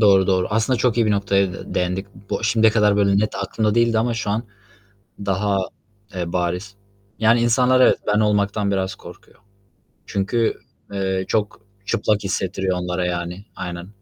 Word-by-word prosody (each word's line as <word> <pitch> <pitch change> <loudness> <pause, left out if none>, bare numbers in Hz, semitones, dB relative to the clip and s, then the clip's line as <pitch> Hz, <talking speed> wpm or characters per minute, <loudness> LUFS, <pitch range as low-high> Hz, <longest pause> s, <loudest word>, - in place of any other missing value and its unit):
doğru, 100 -3 +5
doğru. 95 -2 +2
Aslında 110 +4 +1
çok 120 0 +1
iyi 115 -2 +3
bir - - +2
noktaya 100 -2 +1
de 95 - -8
değindik. 90 +2 -1 0.2
Bo - - -2
şimdiye 110 0 +3
kadar 105 -2 +3
böyle 100 -1 +3
net 110 +1 0
aklımda 105 +2 -1
değildi 115 -1 +3
ama 120 +1 0
şu 110 -2 -2
an 110 +3 0 0.8
daha, 100 0 +1 0.6
eee, 85 -2 -3
bariz. 90 +3 -2 0.4
Yani, 115 +2 +4
insanlar, 125 +2 +4
evet, - - +5
ben 105 0 +3
olmaktan 105 -1 +1
biraz 95 -1 -1
korkuyor. - - -14 0.7
Çünkü, 110 +4 0 0.3
eee, 95 -1 -1
çok 105 -1 -1 0.2
çıplak 105 0 0
hissettiriyor 95 -1 -1
onlara, 90 0 -2
yani. 90 +3 -4
Aynen. 90 -1 -6
100 Hz, 160 wpm, -21 LUFS, 95-110 Hz, 0.8 s, doğru